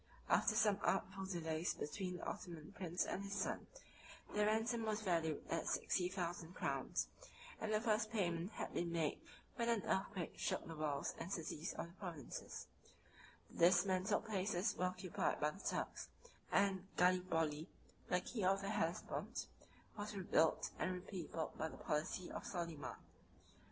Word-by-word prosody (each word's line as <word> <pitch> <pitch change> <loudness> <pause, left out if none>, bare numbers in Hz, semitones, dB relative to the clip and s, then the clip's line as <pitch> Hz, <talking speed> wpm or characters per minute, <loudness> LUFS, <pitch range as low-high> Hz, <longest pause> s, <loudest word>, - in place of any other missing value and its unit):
After 215 - +5
some 210 -3 +4
artful 190 0 +1
delays 165 -2 0
between 180 +4 -3
the - - -8
Ottoman 170 -1 -5
prince 180 -3 0
and - - -2
his 200 0 -3
son, - - -1 0.7
their 210 0 +4
ransom 225 +2 +2
was 215 0 0
valued 165 -5 +1
at 165 - 0
sixty 180 -1 +2
thousand 175 -2 -3
crowns, - - 0 0.5
and 220 - -1
the 215 - +4
first 215 -1 +2
payment 180 -2 0
had - - -4
been 170 0 0
made 165 -3 +1 0.4
when 235 -1 +2
an 230 -4 +3
earthquake 190 -2 -1
shook - - 0
the 165 - -5
walls 150 -2 0
and 185 - -4
cities 165 -3 -2
of - - -2
the 170 - -13
provinces; 170 -7 -5 0.9
the 170 - +7
dismantled 185 +1 +3
places 200 -1 +1
were 180 - +1
occupied 185 0 0
by 150 0 +3
the 195 - -11
Turks; - - -1 0.4
and 190 -2 +3
Gallipoli, 165 -4 +3 0.4
the 180 - +3
key 215 +2 -3
of 195 +1 +4
the 195 - -2
Hellespont, 180 -5 -1 0.5
was 210 0 -3
rebuilt 170 -4 +3
and 185 - +1
repeopled 180 -3 -4
by 160 - +1
the - - -8
policy 155 +4 -1
of - - -4
Soliman. 170 -7 -3
180 Hz, 155 wpm, -41 LUFS, 165-200 Hz, 0.9 s, the